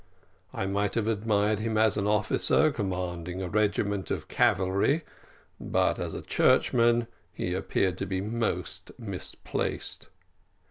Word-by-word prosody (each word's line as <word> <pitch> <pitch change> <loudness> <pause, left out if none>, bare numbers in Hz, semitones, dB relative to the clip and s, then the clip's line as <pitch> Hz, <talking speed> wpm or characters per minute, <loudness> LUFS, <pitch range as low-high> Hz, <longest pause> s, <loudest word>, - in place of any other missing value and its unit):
I - - -3
might 100 +1 0
have 115 -2 0
admired 105 -1 +1
him 110 0 -1
as 110 -1 +4
an 105 -1 0
officer 105 +8 +3
commanding 90 -5 -3
a 95 - -3
regiment 100 -1 0
of - - -3
cavalry, 100 - +2 0.6
but - - +1
as - - -3
a - - -6
churchman 120 0 +3 0.3
he 90 - -3
appeared 95 -1 0
to 100 - -2
be 95 0 -1
most 110 +3 -3
misplaced. 100 -6 -3
100 Hz, 130 wpm, -28 LUFS, 95-110 Hz, 0.6 s, as